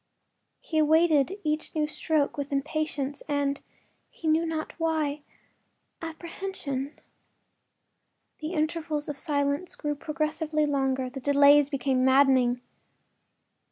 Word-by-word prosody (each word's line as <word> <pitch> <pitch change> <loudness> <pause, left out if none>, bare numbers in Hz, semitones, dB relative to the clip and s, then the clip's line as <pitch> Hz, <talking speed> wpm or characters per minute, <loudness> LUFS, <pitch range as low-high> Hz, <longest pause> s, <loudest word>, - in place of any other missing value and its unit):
He 315 - -1
awaited 315 +2 +3
each 305 +1 -2
new 305 -1 +2
stroke 305 -1 0
with 285 0 -4
impatience 290 -1 -2
and—he 285 +2 -5
knew 320 +2 +3
not 315 -1 -3
why—apprehension. 315 0 -5 1.4
The 310 +3 -4
intervals 310 -2 -1
of 290 -2 -5
silence 285 +2 -1
grew 295 -1 -2
progressively 305 +1 -1
longer; 270 -2 0
the 270 - -6
delays 285 +1 +5
became 265 -2 0
maddening. 260 -2 +4
295 Hz, 95 wpm, -27 LUFS, 280-315 Hz, 1.4 s, delays